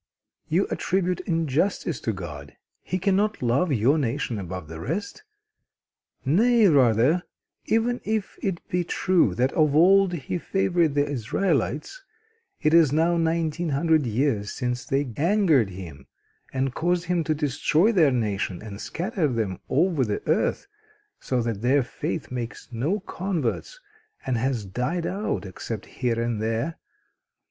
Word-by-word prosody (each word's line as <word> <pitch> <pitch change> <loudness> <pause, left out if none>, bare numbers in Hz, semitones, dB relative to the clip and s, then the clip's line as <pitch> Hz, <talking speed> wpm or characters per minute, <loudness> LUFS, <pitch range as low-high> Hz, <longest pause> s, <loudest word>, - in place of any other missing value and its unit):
"You 180 +5 +2
attribute 185 -1 0
injustice 165 0 0
to 115 - -1
God. 75 -8 -8 0.2
He 185 - -2
cannot 200 0 +1
love 135 +8 +2
your 135 +5 +3
nation 115 -3 -2
above 90 -3 -6
the 80 +1 -8
rest. 170 - -4 1.0
Nay 220 - +4
rather, 135 - +4 0.4
even 235 +2 +1
if 215 -2 -2
it 190 -3 -3
be 180 0 0
true 170 - +2
that 130 +3 +1
of 155 -3 +3
old 190 +3 +5
He 170 +2 -3
favored 175 -5 +1
the 145 0 +2
Israelites, 145 - -1 0.6
it 155 - +3
is 165 -5 +6
now 165 +3 +2
nineteen 165 0 0
hundred 150 0 +2
years 115 -3 0
since 125 -1 -3
they 135 -3 -1
angered 165 - +3
Him, 90 -6 -10 0.4
and 135 -1 -1
caused 175 +3 0
Him 175 -1 0
to 155 - +1
destroy 150 - +2
their 170 -9 +4
nation 105 -6 -1
and 105 -2 -8
scatter 180 -2 -1
them 110 -8 -2
over 165 -2 +2
the 105 -3 -3
earth, - - +1 0.5
so 125 -2 -1
that 115 -3 -3
their 130 +3 +3
faith 155 +4 -5
makes 120 -2 -5
no 145 - -1
converts 185 - -3 0.5
and 130 - 0
has 120 -2 -1
died 125 - -2
out 195 - -2
except 100 +3 -6
here 120 -3 -2
and 115 -2 -1
there. 115 +9 -2
145 Hz, 140 wpm, -25 LUFS, 115-175 Hz, 1.0 s, is